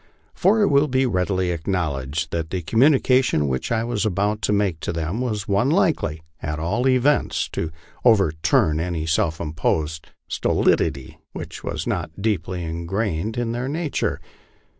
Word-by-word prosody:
For 210 +4 +3
it 200 - +3
will 140 +2 +4
be 130 -1 +2
readily. 95 -4 0
acknowledged 80 -4 -2
that 80 -1 -2
the 90 -1 -3
com 110 +8 0
munication 130 - +4
which 65 -1 -2
I 115 -1 +1
was 115 -3 -1
about 105 +1 0
to 105 - 0
make 100 -5 +1
to - - -3
them 85 +7 -2
was 110 -3 -2
one 100 +6 +2
likely, 140 - +1 0.2
at 75 0 -3
all 105 +11 0
events, 130 +3 +2
to 80 - -3 0.3
overturn 80 -8 +3
any 85 -2 -2
self 80 0 0
imposed 80 0 -2 0.2
stolidity 65 -2 0
which - - -7
was - - -3
not - - -3
deeply 95 -4 -1
impregnated 90 +5 -2
in 120 -1 -1
their 120 +2 -2
nature. 155 +1 -1
95 Hz, 155 wpm, -22 LUFS, 80-120 Hz, 0.3 s, will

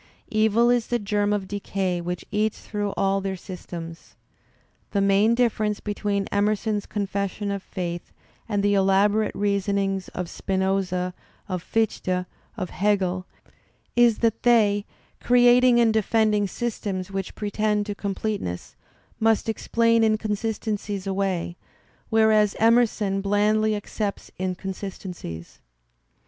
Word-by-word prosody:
Evil 220 +2 +3
is 240 -2 +1
the 240 - +1
germ 205 -1 0
of 205 -2 -1
decay 190 -3 -2
which 175 +1 -4
eats 215 +1 0
through 205 -1 -3
all 195 0 +1
their 195 0 -2
systems. 170 -2 -9 0.7
The 200 - 0
main 200 +3 +4
difference 220 -4 +1
between 205 -1 -2
Emerson's 210 0 0
confession 200 0 -2
of 200 -1 -3
faith 175 -3 -5 0.4
and 205 -2 0
the 205 0 +3
elaborate 200 +2 +3
reasonings 200 -1 0
of 180 -1 -5
Spinoza, 190 -1 -1 0.3
of 185 -3 -3
Fichte, 185 -3 -1 0.3
of 185 -5 -3
Hegel, 185 -1 0 0.7
is 240 -2 +5
that 225 0 +1
they, 210 -4 +3 0.3
creating 245 0 +5
and 230 -2 +4
defending 215 -1 +2
:^stems 195 -3 -4
which 195 -1 -4
pretend 210 0 0
to 205 - -3
completeness, 200 - -4 0.4
must 225 0 +2
explain 230 +1 +2
in 215 -1 +3
consistencies 210 -2 -3
away, 190 -3 -1 0.5
whereas 220 -2 +4
Emerson 225 -4 +3
blandly 210 +2 +2
accepts 205 0 -4
in 185 -1 -1
consistencies. 185 - -7
205 Hz, 120 wpm, -24 LUFS, 195-215 Hz, 0.7 s, is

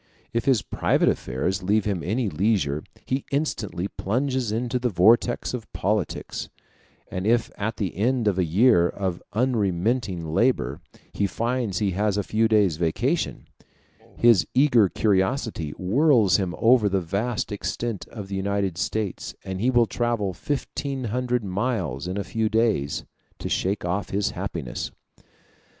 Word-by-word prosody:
If 115 +2 0
his 130 -6 +3
private - - +2
affairs 90 +10 -1
leave 105 +3 +1
him 100 -5 -1
any 110 +7 -1
leisure, 80 -5 0 0.2
he 130 +1 -1
instantly 115 - -1
plunges 125 +3 -1
into 125 +3 -1
the 125 0 0
vortex 115 +7 +3
of 120 -4 -6
politics; - - -2 0.6
and 95 +2 -2
if 115 0 +2
at 110 +3 -3
the 95 -6 -2
end 120 +3 +1
of 95 -2 +2
a - - +4
year 90 +1 +4
of 95 -3 -3
unremitting 105 -4 0
labor 115 +11 +1 0.3
he 100 - +1
finds 115 -1 -1
he 100 -1 +1
has 105 +2 0
a 105 - 0
few 110 +3 +2
days' 105 -7 +3
vacation, 80 -1 -1 0.7
his 115 -7 +5
eager 125 -7 +5
curiosity 100 - 0
whirls 115 - +4
him 95 -3 -2
over 115 -3 +4
the 95 0 +1
vast 105 +8 -2
extent 105 +1 -3
of 105 -4 -8
the 95 - -4
United 95 -2 -1
States, 105 -2 -3
and 95 0 -4
he 125 - +3
will 120 -2 +4
travel 115 -4 -1
fifteen 140 +2 -3
hundred 125 -1 0
miles 95 - -2
in 90 +2 -3
a 100 - -1
few 110 +2 -1
days, 110 -11 +1 0.3
to - - -5
shake 95 0 -1
off 90 +2 -1
his 100 +1 0
happiness. - - -4
105 Hz, 150 wpm, -25 LUFS, 95-120 Hz, 0.7 s, his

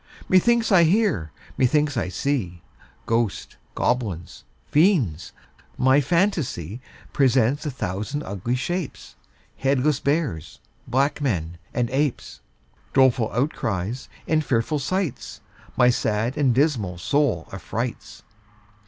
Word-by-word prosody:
Methinks 230 +5 +3
I 180 -3 +7
hear, 175 - +1 0.3
methinks 145 +2 +2
I 115 -6 -1
see 90 - -2 0.4
Ghosts, 115 -3 -1 0.2
goblins, 105 -9 -2 0.2
fiends; 145 - +2 0.5
my 130 +3 +4
phantasy 140 - -1 0.3
Presents 135 +1 +2
a - - 0
thousand 115 +4 -4
ugly 100 +3 -3
shapes, 175 +5 -4 0.4
Headless 135 +1 +1
bears, 140 - -2 0.3
black 140 +4 +1
men, 85 - -2
and 120 -1 0
apes, 140 0 -1 0.6
Doleful 130 -4 +4
outcries, 120 - -2 0.2
and 155 -1 +2
fearful 135 +3 0
sights, 185 +1 -3 0.4
My 125 0 +6
sad 110 +1 -1
and 140 -4 +2
dismal 120 - +1
soul 120 - 0
affrights. - - -5
130 Hz, 105 wpm, -23 LUFS, 110-150 Hz, 0.6 s, I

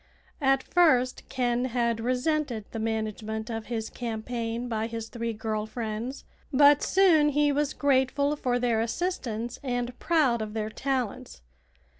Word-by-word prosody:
At 270 -1 +3
first 260 -8 +3
Ken 245 -1 0
had 235 -2 0
resented 250 -1 -1
the 225 - -4
management 220 0 -3
of 225 -1 -5
his 225 -2 -3
campaign 230 0 -4
by 225 -1 -1
his 225 -1 -6
three 230 -1 -3
girl 215 -1 -3
friends; 230 +3 -4 0.3
but 285 +1 +6
soon 335 -6 +4
he 295 0 +2
was 290 0 0
grateful 280 +1 +2
for 250 -4 0
their 240 -2 +1
assistance 235 -4 -3
and 245 -2 -3
proud 285 -9 +2
of 215 0 -5
their 215 0 -2
talents. 245 - -3
245 Hz, 140 wpm, -27 LUFS, 225-270 Hz, 0.3 s, but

